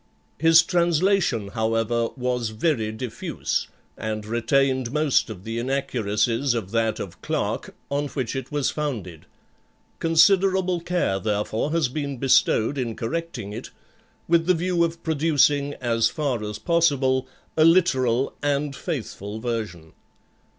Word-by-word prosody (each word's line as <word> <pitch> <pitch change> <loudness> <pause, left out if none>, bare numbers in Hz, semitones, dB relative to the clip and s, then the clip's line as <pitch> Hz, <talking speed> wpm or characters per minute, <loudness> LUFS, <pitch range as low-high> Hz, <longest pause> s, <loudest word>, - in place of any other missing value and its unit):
His 165 +2 +6
translation, 170 - +1
however, 115 +1 0
was 125 -2 -1
very 110 -1 0
diffuse, 110 +1 -3 0.3
and 110 -1 -4
retained 130 +2 +1
most 150 -3 +2
of 95 -4 -8
the 115 +2 -4
inaccuracies 120 -1 0
of 105 -5 -4
that 115 -1 0
of 95 - -7
Clarke, - - -3 0.2
on 145 +1 0
which 130 -3 -4
it 130 +1 -5
was 145 -2 0
founded; 110 - -5 0.7
considerable 185 +2 +3
care 170 - 0
therefore 105 +5 -1
has 165 -5 +2
been 140 +1 -4
bestowed 135 0 +3
in 115 -3 -2
correcting 155 -5 -4
it, - - -7 0.6
with 165 0 +3
the 185 - +4
view 175 0 +1
of 170 0 -3
producing, 145 -2 +2
as 115 -2 +1
far 135 -8 -2
as 105 0 -4
possible, 130 -3 +2 0.3
a 155 - +4
literal 135 -8 +3
and 145 0 0
faithful 110 - -5
version. 110 -9 -4
130 Hz, 130 wpm, -24 LUFS, 115-160 Hz, 0.7 s, His